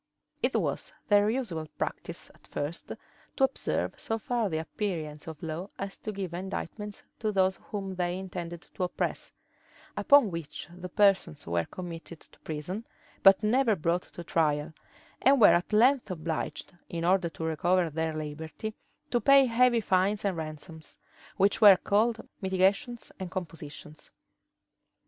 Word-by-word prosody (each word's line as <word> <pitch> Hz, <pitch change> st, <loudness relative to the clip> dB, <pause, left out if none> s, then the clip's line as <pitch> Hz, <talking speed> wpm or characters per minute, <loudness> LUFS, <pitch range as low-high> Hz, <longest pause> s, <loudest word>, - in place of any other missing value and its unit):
It -, -, +1 dB
was -, -, -1 dB, 0.2 s
their 205 Hz, 0 st, +5 dB
usual 200 Hz, -11 st, -2 dB
practice, -, -, -5 dB
at -, -, -22 dB
first, 145 Hz, +4 st, -4 dB
to 270 Hz, -, -6 dB
observe 270 Hz, -, 0 dB
so 225 Hz, -, -1 dB
far 235 Hz, -2 st, -1 dB
the 160 Hz, -, -1 dB
appearance 160 Hz, -3 st, -4 dB
of 160 Hz, -1 st, -8 dB
law 165 Hz, +4 st, -4 dB
as 195 Hz, 0 st, -6 dB
to 215 Hz, -, -4 dB
give 190 Hz, -4 st, -5 dB
indictments 200 Hz, +3 st, -5 dB, 0.2 s
to 215 Hz, -1 st, 0 dB
those 190 Hz, -1 st, +2 dB
whom 195 Hz, -2 st, -4 dB
they 180 Hz, -1 st, -1 dB
intended 175 Hz, -2 st, -6 dB
to -, -, -7 dB
oppress; 180 Hz, -, -2 dB, 0.6 s
upon 280 Hz, -, +5 dB
which 165 Hz, -4 st, -6 dB
the 180 Hz, 0 st, -7 dB
persons 185 Hz, -6 st, +2 dB
were 85 Hz, 0 st, 0 dB
committed 170 Hz, -2 st, -8 dB
to -, -, -19 dB
prison, 160 Hz, +8 st, -5 dB, 0.4 s
but 195 Hz, +2 st, +7 dB
never 230 Hz, +1 st, +3 dB
brought 170 Hz, +1 st, 0 dB
to 175 Hz, -, -10 dB
trial; 155 Hz, -1 st, 0 dB, 0.5 s
and 270 Hz, +1 st, +5 dB
were 210 Hz, -, +8 dB
at 175 Hz, +4 st, +1 dB
length 245 Hz, +3 st, +4 dB
obliged, 160 Hz, -3 st, -4 dB, 0.2 s
in 170 Hz, -1 st, -3 dB
order 180 Hz, -1 st, +3 dB
to 165 Hz, -, -8 dB
recover 170 Hz, +2 st, +1 dB
their 160 Hz, +1 st, -2 dB
liberty, 155 Hz, +7 st, -5 dB, 0.4 s
to 240 Hz, -, +2 dB
pay 275 Hz, -1 st, +7 dB
heavy 240 Hz, -1 st, +4 dB
fines 200 Hz, +2 st, +1 dB
and 195 Hz, -2 st, +1 dB
ransoms, 155 Hz, 0 st, -8 dB, 0.4 s
which 200 Hz, +3 st, +3 dB
were 200 Hz, -3 st, +10 dB
called 220 Hz, +4 st, +1 dB
mitigations 195 Hz, +6 st, +1 dB
and 185 Hz, -2 st, -4 dB
compositions. 155 Hz, -4 st, -8 dB
185 Hz, 150 wpm, -29 LUFS, 160-210 Hz, 0.6 s, were